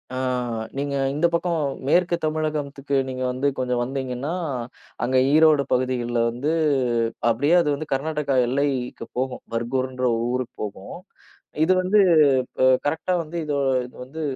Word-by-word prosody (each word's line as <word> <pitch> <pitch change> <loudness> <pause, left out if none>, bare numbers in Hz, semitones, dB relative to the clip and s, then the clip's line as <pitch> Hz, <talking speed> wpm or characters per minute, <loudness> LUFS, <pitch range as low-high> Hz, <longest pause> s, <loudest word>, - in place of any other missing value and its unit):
அ - - -3 0.6
நீங்க 140 0 -2 0.2
இந்தப் 170 +4 +1
பக்கம் 170 -2 0 0.2
மேற்கு 175 +2 +3
தமிழகத்துக்கு 150 -3 -2
நீங்க 130 0 -4
வந்து 130 +3 -1
கொஞ்சம் 125 -1 0
வந்தீங்கன்னா, 130 +2 -3 0.7
அங்க 130 +1 +1 0.2
ஈரோடு 155 -2 +5
பகுதிகள்ல 125 -2 0
வந்து 125 +6 -2 0.8
அப்படியே 145 +8 +2
அது 150 - 0
வந்து 155 +1 -6
கர்நாடகா 150 0 -1
எல்லைக்கு 130 -3 -1
போகும். 130 0 -2
பர்கூர்ன்ற 130 +2 -2
ஒரு 115 - -1
ஊருக்குப் 125 -1 -4
போகும். 105 -2 -7 0.7
இது 185 - +4
வந்து 200 +3 +3 0.9
கரெக்ட்டா 160 +5 0
வந்து 165 +2 -7
இது 150 - -2 0.5
வந்து 155 +5 -8
140 Hz, 125 wpm, -23 LUFS, 125-155 Hz, 0.9 s, ஈரோடு